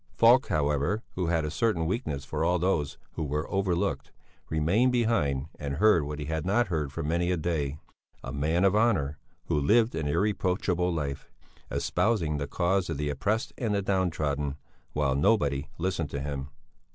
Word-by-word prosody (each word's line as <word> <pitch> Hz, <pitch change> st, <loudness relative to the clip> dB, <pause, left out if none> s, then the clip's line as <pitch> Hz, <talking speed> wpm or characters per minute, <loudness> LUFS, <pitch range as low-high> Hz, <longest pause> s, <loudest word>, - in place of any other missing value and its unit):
Falk, 120 Hz, +4 st, +6 dB
however, 75 Hz, +8 st, 0 dB
who 90 Hz, -2 st, -2 dB
had 80 Hz, -2 st, +1 dB
a 75 Hz, -, -3 dB
certain 95 Hz, -3 st, +1 dB
weakness 80 Hz, -, -2 dB
for -, -, -2 dB
all 90 Hz, -, +3 dB
those 85 Hz, -5 st, 0 dB
who 80 Hz, -, -4 dB
were 75 Hz, +1 st, -2 dB
overlooked 95 Hz, -3 st, 0 dB, 0.4 s
remained 90 Hz, +11 st, +2 dB
behind 95 Hz, -, +1 dB
and 70 Hz, -2 st, -3 dB
heard 105 Hz, 0 st, +5 dB
what 75 Hz, 0 st, -5 dB
he 75 Hz, -, -4 dB
had 80 Hz, 0 st, -2 dB
not 105 Hz, +4 st, +2 dB
heard 75 Hz, -5 st, -1 dB
for 80 Hz, +3 st, -4 dB
many 85 Hz, +3 st, 0 dB
a 90 Hz, -, +1 dB
day: 75 Hz, -4 st, -1 dB, 0.5 s
a 65 Hz, -, -6 dB
man 80 Hz, +5 st, +1 dB
of 95 Hz, +1 st, +4 dB
honour, 95 Hz, -11 st, +2 dB, 0.3 s
who 75 Hz, -, +1 dB
lived 110 Hz, -, +3 dB
an 80 Hz, -2 st, -2 dB
irreproachable 90 Hz, 0 st, +1 dB
life, 70 Hz, -4 st, -3 dB, 0.4 s
espousing 85 Hz, -10 st, 0 dB
the 70 Hz, -1 st, -3 dB
cause 90 Hz, +4 st, 0 dB
of 80 Hz, -, -2 dB
the 75 Hz, 0 st, -1 dB
oppressed 105 Hz, -, -1 dB
and 110 Hz, -4 st, 0 dB
the 100 Hz, -, +1 dB
down 95 Hz, -2 st, +1 dB
trodden 75 Hz, -3 st, -2 dB, 0.4 s
while 75 Hz, -3 st, +1 dB
nobody 70 Hz, -3 st, +2 dB
listened 85 Hz, -3 st, -1 dB
to 70 Hz, -, -4 dB
him. 70 Hz, -1 st, -4 dB
80 Hz, 175 wpm, -28 LUFS, 75-95 Hz, 0.5 s, Falk